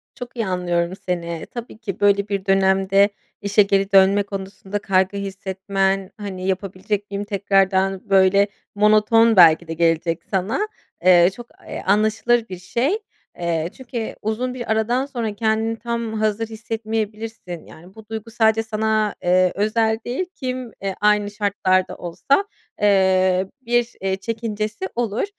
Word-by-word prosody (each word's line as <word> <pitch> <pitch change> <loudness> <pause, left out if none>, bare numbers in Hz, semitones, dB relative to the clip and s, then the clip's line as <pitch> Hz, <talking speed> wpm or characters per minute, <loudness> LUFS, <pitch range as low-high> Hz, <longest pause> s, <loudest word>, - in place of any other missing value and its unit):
Çok 245 0 -9
iyi 225 - 0
anlıyorum 175 -1 -1
seni, 170 -2 -3
tabii 240 -2 -7
ki 200 -5 -6
böyle 200 0 +3
bir 200 -1 -3
dönemde, 195 +1 +3 0.3
işe 205 +1 +4
geri 195 0 +1
dönme 195 +1 +5
konusunda 195 0 -6
kaygı 190 0 +1
hissetmen, 195 0 -2
hani, 190 -3 -5
"Yapabilecek 195 +2 -3
miyim 200 +1 -3
tekrardan?" 195 -1 +1
Böyle, 195 +1 +5 0.3
monoton 215 +2 +4
belki 170 -1 +6
de 165 - -4
gelecek 165 0 +1
sana. 205 - 0 0.4
Eee, 175 -1 +7
çok 240 -1 -10 0.2
eee, - - -5
a 190 - +3
anlaşılır 220 +2 +2
bir 185 - -6
şey, 250 - 0 0.4
eee, 170 -1 -1
çünkü 240 -3 -5
uzun 230 +4 -2
bir 240 -3 -4
aradan 235 +5 +1
sonra 230 -6 -4
kendini 220 +1 0
tam 235 -1 -3
hazır 215 +1 0
hissetmeyebilirsin, 220 -4 -5
yani, 180 +5 -15
bu 220 -1 -13
duygu 225 0 -6
sadece 225 -1 +2
sana, 220 -1 0
eee, 180 0 +3
özel 220 +2 +1
değil, 260 +10 -2
kim, 255 -3 -4
eee, 195 -1 -3
aynı 210 -1 +3
şartlarda 195 -3 0
olsa, 275 - 0 0.4
eee, 190 -2 +3
bir, 240 -1 0
eee, 190 0 0
çekincesi 215 -1 -4
olur. 230 - -1
205 Hz, 140 wpm, -21 LUFS, 190-225 Hz, 0.4 s, Eee